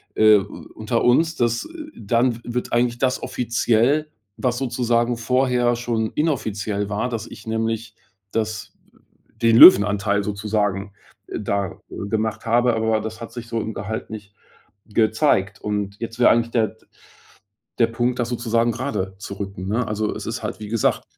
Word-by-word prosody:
äh, 110 -1 +7
u 100 +1 -9
unter 110 +2 -1
uns, 160 +7 +3
dass, 120 -3 0
äh - - -11 0.3
dann 115 +3 +1
w - - -11
wird 120 +1 -3
eigentlich 120 0 +1
das 130 0 0
offiziell, 120 +5 +1 0.3
was 125 -2 -1
sozusagen 120 -2 0
vorher 125 0 +1
schon 115 -2 -2
inoffiziell 105 -9 -1
war, 105 +4 -1
dass 115 -3 -4
ich - - -12
nämlich 110 0 -2 0.4
das 110 -1 -3 0.7
den 115 -1 +5
Löwenanteil 100 - +7
sozusagen, 100 -1 -2 0.4
äh, - - -5
da, 100 -2 -2
äh, 100 - -6
gemacht 110 0 -2
habe. 120 +1 +3
Aber 110 -1 +1
das 110 +1 -7
hat 115 - -7
sich 120 -1 -7
so 115 -1 -2
im 110 +1 -4
Gehalt 105 +3 -5
nicht 105 -2 -9 0.5
gezeigt. 110 -2 +1
Und 105 -1 -3
jetzt 115 0 -6
wäre 120 - +6
eigentlich 115 0 +1
der 115 -2 +2
d - - -22 0.9
der 115 - +5
Punkt, 120 +2 -1
das 120 - -1
sozusagen 115 -1 +1
grade 95 -8 -3
zu 100 - -8
rücken, 100 -2 -6
ne? 115 +4 0
Also, 105 0 -2
es - - -7
ist - - -4
halt, - - -5
wie 105 - -7
gesagt, 115 0 0
115 Hz, 165 wpm, -22 LUFS, 105-120 Hz, 0.9 s, äh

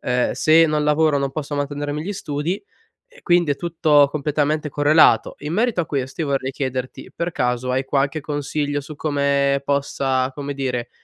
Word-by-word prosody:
ehm, 125 0 0
se 160 +1 +5
non 150 -1 0
lavoro, 150 -1 +3
non 140 0 -1
posso 150 -1 -4
mantenermi 145 +1 -3
gli 200 +5 -4
studi 150 +2 -3 0.5
e, - - -20
quindi, 175 -4 +3
è - - -1
tutto 155 -4 +3
completamente 150 +1 -1
correlato. 150 +2 +4
In 150 +2 -5
merito 220 -3 +1
a - - -4
questo, 135 +2 -3
io 155 - -2
vorrei 135 -1 -1
chiederti: 130 -2 -5
per 170 +1 -3
caso, 125 -3 -1
hai 130 +1 0
qualche 140 +3 0
consiglio 145 0 -2
su 150 +2 -10
come 140 -2 +1
possa, 135 -2 0
come 140 0 -5
dire, 125 -3 -3
145 Hz, 175 wpm, -21 LUFS, 140-155 Hz, 0.5 s, se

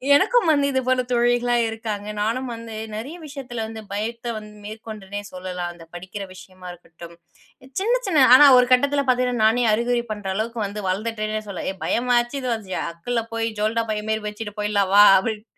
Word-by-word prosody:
எனக்கும் 390 +3 +3
வந்து 285 -2 +3
இதுபோல 255 -1 +1
தோழிகளாம் 240 0 +2
இருக்காங்க. 220 -2 -5
நானும் 230 +5 -1
வந்து 230 -1 -8 0.2
நிறைய 250 +10 -6
விஷயத்துல 265 -6 -6
வந்து 220 0 -8
பயத்த 235 +3 -3
வந்து 210 0 -10
மேற்கொண்டனே 210 -2 -7
சொல்லலாம். 180 -1 -5
அந்த 170 -1 -14
படிக்கிற 185 +3 -7
விஷயமா 185 0 -13
இருக்கட்டும். 170 -1 -13 0.6
சின்ன, 455 +6 +2
சின்ன 310 -8 +4
ஆனா, 290 - +9
ஒரு 250 - +5
கட்டத்துல 280 +3 +3
பாத்தீங்கன்னா 250 -2 +1
நானே 235 +3 +3
அறிவுரை 235 +2 0
பண்ற 205 -2 -5
அளவுக்கு 230 +3 -3
வந்து 205 +1 -5
வளந்துட்டேன்னே 215 +2 -2
சொல்லலாம். 200 -3 -4
"ஏ - - -10
பயமாச்சு, 240 +1 +1
இதுவாச்சு, 225 -7 -3 0.2
அக்குல்ல 230 +8 -3
போய் 230 0 -1
ஜோல்னா 220 +2 +1
பை 210 - -1
மாரி 220 0 -1
வச்சுட்டு 210 0 -7
போயிடலாம். 205 -2 0
வா", 205 - +9 0.2
அப்டின். 215 +1 -4
225 Hz, 165 wpm, -22 LUFS, 205-245 Hz, 0.6 s, ஆனா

